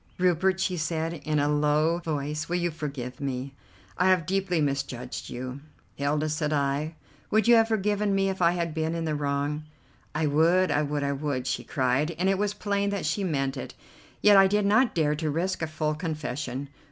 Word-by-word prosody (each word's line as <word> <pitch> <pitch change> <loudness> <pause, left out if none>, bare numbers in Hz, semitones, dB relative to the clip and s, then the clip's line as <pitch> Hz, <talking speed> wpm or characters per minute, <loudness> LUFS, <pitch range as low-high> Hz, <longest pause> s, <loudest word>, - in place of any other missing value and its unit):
"Rupert," 185 +1 +2
she 185 -1 0
said 160 +1 -1
in 155 -1 -2
a 145 0 +2
low 150 +3 +2
voice, 150 -1 -3
"will 175 - 0
you 175 -1 0
forgive 140 -5 -6
me? 135 0 -3 0.5
I 180 - +4
have 185 -4 +3
deeply 190 -2 0
misjudged 135 -4 -3
you." 130 +2 -6 0.3
"Hilda," 145 +2 0
said 150 0 -1
I, 145 +2 0 0.3
"would 215 0 +2
you 240 - +7
have 225 -1 +6
forgiven 210 -2 +1
me 195 0 +2
if 190 -1 -3
I 170 0 +5
had 170 -2 -2
been 160 +1 -1
in 165 -1 -2
the 155 - -1
wrong?" 145 +1 -1 0.5
"I 155 +1 +1
would, 165 +5 +3
I 145 - +2
would, 145 -1 -1
I 140 - 0
would," 140 -2 -2
she - - -2
cried, 135 +5 0
and 185 +3 +1
it 195 0 +1
was 205 0 0
plain 200 -1 0
that 200 -4 -2
she 170 +6 0
meant 135 -6 -1
it, - - -7 0.5
yet 210 -1 +7
I 195 0 +8
did 205 +1 +1
not 220 +4 +3
dare 150 -3 +2
to 155 +1 -2
risk 175 +5 -1
a 160 - 0
full 155 0 -1
confession. 145 -4 -4
155 Hz, 200 wpm, -27 LUFS, 145-185 Hz, 0.5 s, I